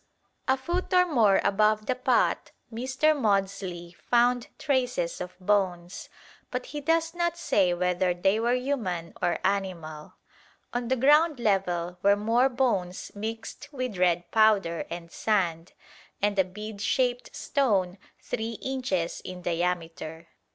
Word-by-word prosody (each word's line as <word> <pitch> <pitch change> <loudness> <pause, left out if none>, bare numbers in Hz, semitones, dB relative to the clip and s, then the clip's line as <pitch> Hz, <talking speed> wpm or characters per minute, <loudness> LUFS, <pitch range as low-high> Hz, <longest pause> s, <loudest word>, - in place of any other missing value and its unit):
A 265 0 +3
foot 345 +7 -3
or 360 0 +6
more 230 - +4
above 215 +1 +2
the 255 - +1
pot 255 0 +1 0.2
Mr. 265 +6 +1
Maudslay 195 -7 -1
found 245 +2 +2
traces 250 - -1
of 180 0 -7
bones, 185 -2 -1 0.4
but 250 0 -4
he 295 0 -6
does 330 +2 +1
not 345 -1 -1
say 195 - +2
whether 180 +1 +1
they 190 +4 +1
were 240 +2 +2
human 220 -11 -2
or 175 -2 +1
animal. 175 -6 -3 0.6
On 245 0 -2
the 260 - +2
ground 295 +3 +4
level 180 -5 0
were 200 +1 +5
more 230 +5 +2
bones 215 -9 -1
mixed 225 +6 -6
with 255 -8 -4
red 175 -1 +1
powder 205 -7 +3
and 170 0 -7
sand, 175 -6 -1 0.5
and 205 -1 +1
a - - +6
bead 205 +3 -8
shaped 245 +1 0
stone 200 -9 0 0.2
3 225 0 -3
inches 230 -9 -2
in 180 -1 -8
diameter. 165 -2 -3
205 Hz, 135 wpm, -27 LUFS, 180-250 Hz, 0.6 s, or